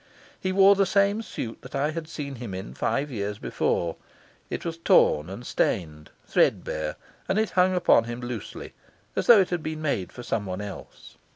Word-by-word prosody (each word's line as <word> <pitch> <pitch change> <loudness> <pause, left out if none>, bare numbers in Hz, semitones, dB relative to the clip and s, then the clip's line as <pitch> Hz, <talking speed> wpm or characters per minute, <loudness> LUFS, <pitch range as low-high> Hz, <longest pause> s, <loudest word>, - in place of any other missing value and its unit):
He 185 - -1
wore 195 +1 +7
the 195 -1 +2
same 200 +3 +2
suit 120 - -6
that 125 - -9
I 145 +3 +1
had 160 0 -5
seen 140 -4 -6
him 115 -6 -6
in 95 +2 -7
five 145 +1 -1
years 105 -3 -3
before; 85 -4 -1 0.5
it - - -4
was 165 -1 -4
torn 75 - +4
and 100 +6 -8
stained, 75 -4 -1 0.2
threadbare, 75 -1 +1 0.3
and 190 - +1
it 220 0 +1
hung 185 0 +3
upon 175 -9 +4
him 120 +1 -5
loosely, 120 -3 -6 0.4
as - - -1
though 225 -4 +9
it 185 - -1
had 175 -2 -1
been 155 0 -5
made 115 - -1
for 125 - -9
someone 100 -5 -2
else. 105 -1 -9
135 Hz, 185 wpm, -26 LUFS, -, 0.5 s, though